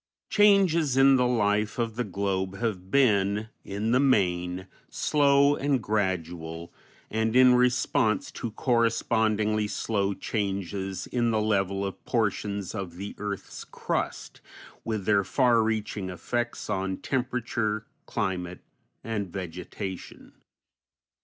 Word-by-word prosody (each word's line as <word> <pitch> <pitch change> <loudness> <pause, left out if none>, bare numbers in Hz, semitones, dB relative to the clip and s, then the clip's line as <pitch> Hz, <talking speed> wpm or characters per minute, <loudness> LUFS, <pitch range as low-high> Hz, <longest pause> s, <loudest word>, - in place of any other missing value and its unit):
Changes 185 -9 +4
in 135 0 +7
the 125 -1 +3
life 105 -2 +1
of 115 -2 -2
the 125 - -1
globe 95 -2 -2
have 95 -5 -3
been 105 -5 +2
in 105 +3 -2
the 125 - +4
main 90 -8 +1 0.2
slow 140 -1 +3
and 140 -2 +1
gradual, 85 -6 -3 0.4
and 110 +1 0
in 130 0 +7
response 125 -4 +2
to 120 - -5
correspondingly 110 -2 +1
slow 100 -1 -1
changes 95 -3 -3
in 120 -1 0
the 110 -1 +1
level 100 -2 0
of 95 - -6
portions 100 -4 -1
of 95 -5 -5
the 100 +3 -6
earth's 100 -1 -5
crust, - - -4 0.4
with 110 -4 -3
their 100 -1 +3
far 120 0 +3
reaching 110 -3 -2
effects 120 +6 -3
on 95 -2 -2
temperature, 115 -4 -2 0.2
climate, 90 -5 -3 0.4
and 105 -4 -3
vegetation. 90 +1 -7
105 Hz, 115 wpm, -27 LUFS, 95-120 Hz, 0.4 s, in